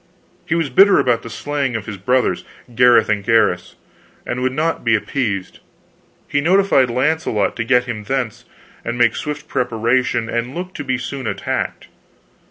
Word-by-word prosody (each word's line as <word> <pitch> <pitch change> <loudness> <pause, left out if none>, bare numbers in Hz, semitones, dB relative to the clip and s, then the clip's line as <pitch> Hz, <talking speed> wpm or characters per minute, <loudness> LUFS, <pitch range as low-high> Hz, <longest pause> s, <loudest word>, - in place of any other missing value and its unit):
He 160 - +1
was 165 -5 -1
bitter 195 +8 +6
about 120 -2 +2
the 115 - -9
slaying 135 +4 -2
of 110 -2 -4
his 105 -3 -6
brothers, 125 +6 +1 0.3
Gareth 120 -2 +5
and 105 -2 0
Gaheris, 105 -5 +1 0.5
and 125 +1 -3
would 130 0 +1
not 155 +5 -1
be 115 -1 +3
appeased. 105 -5 -2 0.7
He 145 - 0
notified 175 -6 +3
Launcelot 130 -3 0
to 115 - -1
get 125 +2 +3
him 120 -4 -5
thence, 125 -1 -3 0.4
and 120 - -3
make 120 -2 +3
swift 150 0 -5
preparation, 120 -1 0
and 120 +3 -3
look 180 +1 -5
to 145 - -6
be 130 -2 -1
soon 130 0 -5
attacked. - - -3
125 Hz, 165 wpm, -19 LUFS, 115-140 Hz, 0.7 s, bitter